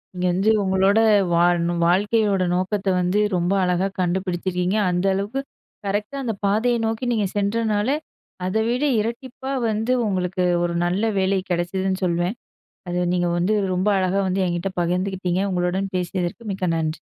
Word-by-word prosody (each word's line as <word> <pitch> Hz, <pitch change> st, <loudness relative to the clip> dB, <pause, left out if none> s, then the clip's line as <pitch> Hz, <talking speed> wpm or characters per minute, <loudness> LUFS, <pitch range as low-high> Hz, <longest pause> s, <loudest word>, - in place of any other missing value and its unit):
இங்க 180 Hz, 0 st, -2 dB
வந்து 195 Hz, +5 st, +2 dB
உங்களோட 190 Hz, +2 st, +3 dB, 0.4 s
வாழணும், 175 Hz, 0 st, +2 dB
வாழ்க்கையோட 200 Hz, +1 st, +2 dB
நோக்கத்த 190 Hz, +3 st, -1 dB
வந்து 180 Hz, +3 st, +1 dB, 0.2 s
ரொம்ப 175 Hz, +2 st, +1 dB
அழகா 180 Hz, +1 st, +1 dB
கண்டுபிடிச்சிருக்கீங்க. 180 Hz, +1 st, -1 dB
அந்த 180 Hz, +1 st, 0 dB
அளவுக்கு 205 Hz, +8 st, -2 dB, 0.4 s
கரெக்ட்டா 210 Hz, +7 st, -2 dB
அந்த 230 Hz, -3 st, -1 dB
பாதய 220 Hz, +4 st, +2 dB
நோக்கி 225 Hz, +3 st, -2 dB
நீங்க 215 Hz, -4 st, +1 dB
சென்றனால, 210 Hz, +1 st, 0 dB, 0.6 s
அதை 190 Hz, +4 st, 0 dB
விட 250 Hz, +4 st, 0 dB, 0.2 s
இரட்டிப்பா 250 Hz, +4 st, -4 dB, 0.2 s
வந்து 220 Hz, +3 st, -1 dB, 0.2 s
உங்களுக்கு 185 Hz, -1 st, -1 dB, 0.2 s
ஒரு 175 Hz, 0 st, -1 dB
நல்ல 180 Hz, +4 st, 0 dB, 0.2 s
வேலை 190 Hz, 0 st, +2 dB
கெடைச்சதுன்னு 185 Hz, +2 st, -1 dB
சொல்வேன். 175 Hz, +4 st, 0 dB, 0.5 s
அத 175 Hz, 0 st, -1 dB
நீங்க 175 Hz, -1 st, +1 dB
வந்து 180 Hz, +5 st, +1 dB, 0.2 s
ரொம்ப 185 Hz, +3 st, +1 dB
அழகா 185 Hz, +1 st, +1 dB
வந்து 190 Hz, +1 st, 0 dB
என்கிட்ட 175 Hz, +2 st, -2 dB
பகிர்ந்துக்கிட்டீங்க. 185 Hz, +1 st, -1 dB
உங்களுடன் 185 Hz, +2 st, -1 dB
பேசியதற்கு 180 Hz, +4 st, -3 dB
மிக்க 185 Hz, -1 st, -2 dB
நன்றி. 155 Hz, -1 st, -2 dB
190 Hz, 140 wpm, -22 LUFS, 180-210 Hz, 0.6 s, உங்களோட